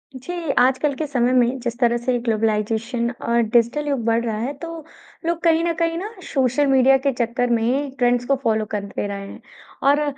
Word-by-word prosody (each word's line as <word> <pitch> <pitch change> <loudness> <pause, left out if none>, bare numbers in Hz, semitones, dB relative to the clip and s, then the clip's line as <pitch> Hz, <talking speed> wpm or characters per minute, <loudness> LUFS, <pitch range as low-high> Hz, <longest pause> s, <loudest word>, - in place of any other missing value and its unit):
जी, 260 +8 -7 0.3
आजकल 260 +3 +2
के 310 - -3
समय 250 -2 +1
में 255 +1 +2
जिस 235 -1 -4
तरह 240 -1 +3
से 245 +1 0
ग्लोबलाइज़ेशन 225 +1 0 0.2
और 235 0 +3
डिजिटल 235 +6 +1
युग 275 -5 -1
बढ़ 230 0 +2
रहा 220 -2 -2
है, 245 +6 -3
तो 330 +1 -8 0.4
लोग 335 0 0
कहीं 330 0 +3
न 340 0 +1
कहीं 330 0 +1
ना, 390 +5 -4 0.2
सोशल 270 +1 +2
मीडिया 270 0 +5
के 275 - +4
चक्कर 245 +1 -1
में 250 +5 0
ट्रेंड्स 245 0 +2
को 275 - +2
फ़ॉलो 220 -2 +1
करते 200 0 -4
रहे 200 -1 -6
हैं - - -11 0.5
और 290 +2 +4
245 Hz, 195 wpm, -21 LUFS, 230-280 Hz, 0.5 s, मीडिया